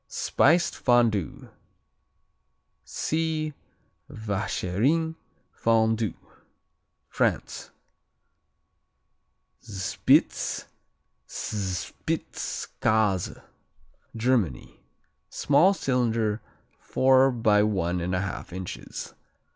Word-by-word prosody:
Spiced 170 +5 +2
Fondue 115 -7 +1 1.3
see 155 -1 -2 0.6
Vacherin 110 - -1 0.4
Fondu. 110 -1 +1 0.9
France - - -1 1.9
Spitz 100 -4 +1 0.6
Spitzkase 100 +1 -2 0.7
Germany 110 - 0 0.5
Small 170 +8 +3
cylinder, 115 - 0 0.4
four 130 +1 +4
by 110 -4 +3
one 95 -4 0
and 90 +2 -1
a 90 - 0
half 100 -1 -5
inches. 90 0 -7
110 Hz, 55 wpm, -26 LUFS, 100-130 Hz, 1.9 s, four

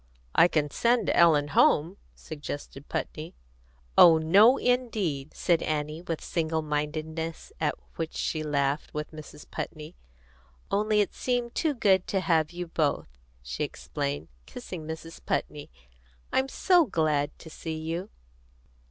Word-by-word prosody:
"I - - +7
can 150 -4 0
send 240 +6 +2
Ellen 150 -4 +4
home," 160 +5 +3 0.2
suggested 145 -2 -8
Putney. 155 +2 -4 0.6
"Oh 165 -2 +8
no, 200 +11 +6
indeed!" 210 - -1
said 170 -2 +2
Annie, 150 +1 -2
with 165 -3 -4
single 160 -1 -1
mindedness 155 - -4
at - - +1 0.2
which 165 -1 -4
she 155 - -1
laughed 145 -1 -1
with 150 0 -4
Mrs. 150 -1 -11
Putney. 155 +1 -6 0.8
"Only 210 +1 +2
it 205 - -1
seemed 245 -2 -1
too 310 -4 0
good 190 -5 +3
to 195 - 0
have 165 -4 +2
you 175 0 -5
both," 155 - -1 0.3
she 65 +1 -3
explained, 70 +3 -4 0.2
kissing 180 -10 -8
Mrs. 160 +1 -8
Putney. 145 -1 -3 0.6
"I'm 265 - +2
so 350 +3 +3
glad 150 -5 0
to 160 - -12
see 160 0 -5
you!" 165 +5 -4
160 Hz, 135 wpm, -27 LUFS, 150-190 Hz, 0.8 s, Oh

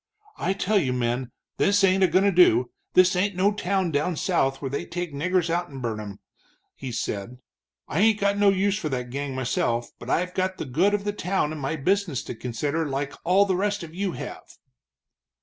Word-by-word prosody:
"I 190 - 0
tell 200 +2 +1
you, 130 -8 0
men, 125 0 -1 0.3
this 205 0 +3
ain't 190 0 +4
a - - +6
goin' 185 +3 +3
to 200 - +4
do 125 - +4 0.2
this 185 0 +6
ain't 195 +2 +1
no 195 +3 +3
town 190 -3 0
down 150 +4 0
south 135 -6 0
where 135 -2 -4
they 140 - -2
take 175 -3 -5
niggers 180 +4 0
out 170 +1 -1
and 135 -2 -8
burn 115 -4 -3
'em," 100 -2 -7 0.6
he 130 -2 -7
said. 115 0 -4 0.5
"I 155 - -2
ain't 215 0 +4
got 200 0 +2
no 205 -1 +6
use 195 +1 +1
for 155 - -3
that 125 -3 -3
gang, 140 0 -4
myself, 125 -2 -1
but 120 - -9
I've 180 +4 0
got 185 0 -1
the - - -4
good 175 +11 +2
of 200 - -3
the 205 0 -2
town 185 -5 -1
and 155 -2 -6
my 135 +4 -1
business 175 -1 0
to - - -6
consider, 140 +7 -2
like 140 0 -3
all 190 +4 +4
the 190 -2 0
rest 205 +1 -1
of 160 -1 -9
you 190 0 -2
have." - - -8
170 Hz, 215 wpm, -25 LUFS, 135-195 Hz, 0.6 s, a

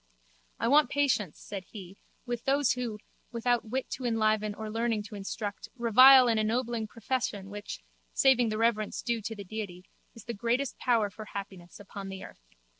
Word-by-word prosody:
I - - 0
want 295 +4 +5
patience, 225 - +1
said 195 -3 -7
he, 190 -1 -10 0.3
with 240 -1 -4
those 275 -1 +3
who, 240 -4 -3 0.3
without 235 -1 0
wit 260 +3 -2
to 255 - -5
enliven 215 -2 +1
or 220 0 -6
learning 225 0 -1
to 210 0 -10
instruct, 205 +1 -5
revile 255 +2 +8
an 225 -2 +2
ennobling 230 0 -1
profession 210 -4 -3
which, 205 0 -7 0.3
saving 250 -4 +4
the 215 - -2
reverence 225 -2 0
due 235 -2 -1
to 225 +2 -5
the 205 - -7
Deity, 185 -3 -6 0.3
is 230 - -11
the 235 - -5
greatest 240 +5 -1
power 225 -5 +2
for 215 +3 -9
happiness 195 -3 -8
upon 200 -1 -8
the 190 0 -7
earth. - - -12
220 Hz, 175 wpm, -29 LUFS, 205-240 Hz, 0.3 s, revile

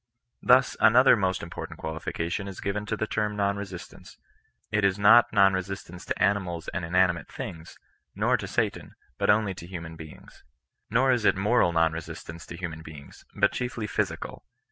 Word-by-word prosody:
Thus 130 +1 +4
another 125 +5 +6
most 95 -3 -1
important 85 - -7
qualification 85 +4 -4
is 95 - -8
given 105 +1 -3
to 110 - -2
the 110 - -1
term 105 -1 -2
non 100 -1 +1
resistance. 95 -3 -9 0.5
It 105 -1 +1
is 100 -1 +3
not 110 +4 +6
non 100 -2 +5
resistance 95 -2 -5
to - - -3
animals 90 -5 0
and 95 - -4
inanimate 90 0 +1
things, 85 -11 -8 0.4
nor - - +2
to - - -6
satan, - - -2 0.2
but - - 0
only 105 -1 +3
to 85 -2 -10
human 85 -3 -7
beings. 80 -1 -13 0.5
Nor 130 +4 +3
is 120 -3 +1
it - - +4
mor<d 95 -3 +2
non 80 -1 +3
resistance 80 +1 -8
to 85 - -8
hu 90 0 -3
man 80 0 -9
beings, 75 -3 -12
but - - +3
chiefly 120 -3 -3
physical. 105 - -3
95 Hz, 175 wpm, -27 LUFS, 85-105 Hz, 0.5 s, another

